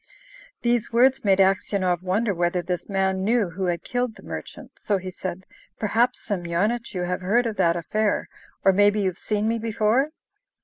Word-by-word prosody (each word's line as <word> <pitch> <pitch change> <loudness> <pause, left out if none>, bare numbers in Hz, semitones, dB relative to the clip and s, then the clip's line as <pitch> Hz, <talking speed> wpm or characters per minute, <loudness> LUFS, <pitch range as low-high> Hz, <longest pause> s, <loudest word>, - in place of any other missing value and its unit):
These 235 -1 +1
words 255 +3 +4
made 195 -2 +4
Aksionov 190 -2 +2
wonder 200 +4 0
whether 175 0 0
this 180 +3 -4
man 190 -1 0
knew 220 -3 +1
who 190 +3 -3
had 175 -1 -1
killed 245 -2 -2
the - - -15
merchant; - - -8
so 205 - 0
he 185 0 -6
said, 185 0 -6 0.3
"Perhaps, 225 +3 +1
Semyonich, 200 +5 -1
you 180 - -1
have 180 +1 -2
heard 225 +7 +2
of 220 -3 -3
that 170 -3 +3
affair, 210 +5 0 0.4
or 195 - +6
maybe 205 +2 +4
you've 185 -2 -1
seen 210 0 -1
me 230 +1 0
before?" 225 +5 +1
200 Hz, 175 wpm, -24 LUFS, 185-225 Hz, 0.4 s, or